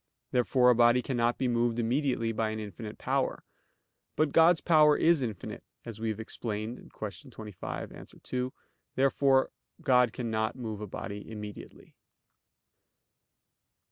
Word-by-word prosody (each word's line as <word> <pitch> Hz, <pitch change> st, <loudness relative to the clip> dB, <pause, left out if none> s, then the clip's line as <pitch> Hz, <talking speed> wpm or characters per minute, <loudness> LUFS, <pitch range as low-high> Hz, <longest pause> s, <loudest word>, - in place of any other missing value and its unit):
Therefore 125 Hz, 0 st, +4 dB
a -, -, +3 dB
body 120 Hz, +1 st, +5 dB
cannot 120 Hz, -2 st, 0 dB
be 130 Hz, -, 0 dB
moved 120 Hz, -1 st, +1 dB
immediately 120 Hz, -1 st, 0 dB
by 110 Hz, 0 st, -1 dB
an 110 Hz, 0 st, -4 dB
infinite 105 Hz, +1 st, -7 dB
power. -, -, -1 dB, 0.7 s
But 155 Hz, -2 st, +2 dB
God's 165 Hz, +2 st, +6 dB
power 150 Hz, -3 st, +5 dB
is 165 Hz, -3 st, +4 dB
infinite, 110 Hz, -7 st, -5 dB, 0.2 s
as 115 Hz, -2 st, -7 dB
we 115 Hz, 0 st, -1 dB
have 110 Hz, 0 st, -3 dB
explained 110 Hz, +1 st, -5 dB
(Q. 105 Hz, +3 st, -7 dB
25, 105 Hz, -5 st, -7 dB
A. -, -, -10 dB
2). 125 Hz, 0 st, -4 dB, 0.4 s
Therefore 135 Hz, 0 st, +3 dB, 0.3 s
God 125 Hz, -2 st, +4 dB
cannot 110 Hz, -2 st, -2 dB
move 110 Hz, -5 st, -5 dB
a 105 Hz, -, -5 dB
body 100 Hz, +1 st, -7 dB
immediately. 105 Hz, -2 st, -9 dB
120 Hz, 135 wpm, -29 LUFS, 110-130 Hz, 0.7 s, God's